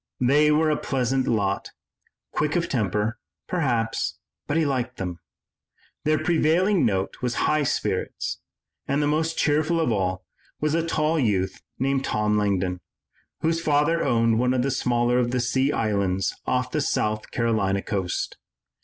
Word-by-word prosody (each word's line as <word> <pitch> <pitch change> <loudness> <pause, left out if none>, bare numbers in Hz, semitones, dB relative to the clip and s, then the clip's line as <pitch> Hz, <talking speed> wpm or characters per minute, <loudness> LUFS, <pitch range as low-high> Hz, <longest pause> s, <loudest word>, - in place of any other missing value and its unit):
They 145 +4 +4
were 155 +1 +3
a 150 - +1
pleasant 130 0 0
lot, 100 -4 0 0.6
quick 150 +1 0
of 170 -1 +1
temper, 105 -1 -1 0.3
perhaps, 120 -10 -1 0.3
but 145 - 0
he 165 - +3
liked 130 -3 -2
them. 90 -2 -4 0.9
Their 155 +1 +3
prevailing 175 - +2
note 95 -2 -2
was 125 -1 -1
high 155 0 +2
spirits, 140 - -2 0.5
and 140 - +1
the 150 - +2
most 160 +2 0
cheerful 155 +3 +2
of 160 -7 +1
all 95 -3 -1 0.3
was 155 0 0
a 165 0 +2
tall 160 -1 +1
youth 95 -7 0 0.2
named 135 +1 0
Tom 105 -3 0
Langdon, 95 -3 0 0.6
whose 165 +1 +1
father 155 +2 +2
owned 115 -3 +2
one 125 +1 +2
of 125 - +1
the 135 - 0
smaller 120 -1 +1
of 120 -1 +1
the 125 +1 0
sea 130 +3 +1
islands 100 -5 0
off 125 0 0
the 150 - 0
South 110 -5 -1
Carolina 110 -5 0
coast. 95 -4 -2
125 Hz, 155 wpm, -24 LUFS, 105-150 Hz, 0.9 s, They